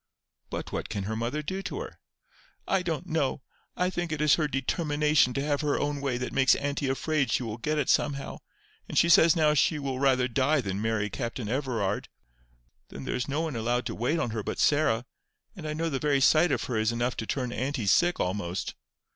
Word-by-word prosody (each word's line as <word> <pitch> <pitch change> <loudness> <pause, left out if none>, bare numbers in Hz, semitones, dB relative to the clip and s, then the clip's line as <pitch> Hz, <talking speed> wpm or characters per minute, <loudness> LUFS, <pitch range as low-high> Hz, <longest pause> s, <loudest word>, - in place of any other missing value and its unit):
"But - - -5
what - - -4
can 100 -3 -3
her 110 +3 -3
mother 120 +7 -2
do 190 +5 -3
to 300 - -5
her?" 460 - -9 0.7
"I 195 - +2
don't 170 -1 -3
know. 155 -5 -1 0.3
I 180 +1 +1
think 175 -2 -3
it 155 - -2
is 150 -1 +4
her 155 -2 +2
determination 150 0 +1
to 135 - 0
have 145 -1 0
her 150 -2 0
own 145 -1 -2
way 135 -3 -1
that 125 - -4
makes 135 -1 +5
auntie 140 -1 -2
afraid 140 -1 0
she - - +1
will 110 -1 -5
get 150 +6 -1
it 145 - 0
somehow; 140 -2 0 0.5
and - - -3
she 170 - +5
says 165 0 +7
now 155 -2 +3
she 150 +2 +2
will 135 -3 -3
rather 130 -2 +3
die 135 +4 +2
than 100 -4 -3
marry 110 -2 -1
Captain 120 -3 -4
Everard. 115 -5 -1 0.8
Then 70 - -8
there - - -3
is 125 - -2
no 145 +3 -1
one 160 -5 -3
allowed 120 +2 0
to - - -3
wait 130 +8 0
on 135 -8 -1
her 110 -1 -2
but - - -4
Sarah, 140 -6 +2 0.5
and 165 -5 -7
I 150 - -2
know 165 +2 -1
the 135 - -1
very 145 -1 +2
sight 155 +5 +5
of 130 - 0
her 120 - -2
is 110 +1 +2
enough 120 +1 -1
to 110 - -4
turn 125 -3 -2
auntie 130 -1 -2
sick 175 - +3
almost. 90 -2 -2
140 Hz, 220 wpm, -28 LUFS, 120-155 Hz, 0.8 s, says